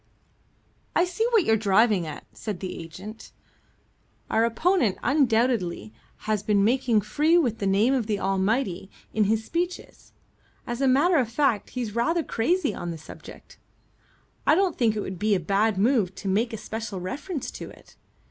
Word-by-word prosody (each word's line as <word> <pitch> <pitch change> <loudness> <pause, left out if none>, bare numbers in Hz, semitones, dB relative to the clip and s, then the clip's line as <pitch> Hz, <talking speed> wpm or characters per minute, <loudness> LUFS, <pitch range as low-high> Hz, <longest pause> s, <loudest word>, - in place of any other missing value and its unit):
"I 350 - +4
see 365 +6 -1
what 455 -6 +4
you're 225 - +3
driving 205 -3 +3
at," 150 - -8
said 210 -5 -5
the 185 - -5
agent. 190 +7 -10 1.0
"Our 225 +1 +3
opponent 235 - +1
undoubtedly 230 - +1 0.3
has 215 -2 0
been 205 -1 +2
making 235 -1 +2
free 305 - +2
with 245 -10 +1
the 200 - -1
name 205 +7 +3
of 245 -5 0
the 210 -2 -1
Almighty 195 +1 0 0.2
in 215 -1 +2
his 220 +2 +1
speeches. 350 +5 -4 0.5
As 240 +2 -4
a 270 - +3
matter 305 +7 +4
of 250 -5 +1
fact 240 -4 +1
he's 230 -4 -3
rather 320 +9 +1
crazy 300 +7 0
on 175 - -5
the 165 - -5
subject. 155 - -13 0.9
I - - +6
don't 370 -2 +1
think 225 -3 +2
it 210 - -2
would 190 -3 -6
be 210 0 +2
a - - +1
bad 200 +4 +1
move 205 -3 +2
to 195 - -7
make 220 +5 +1
a 225 - -4
special 220 -2 -5
reference 280 - -5
to - - -8
it. - - -17
225 Hz, 170 wpm, -25 LUFS, 200-270 Hz, 1.0 s, I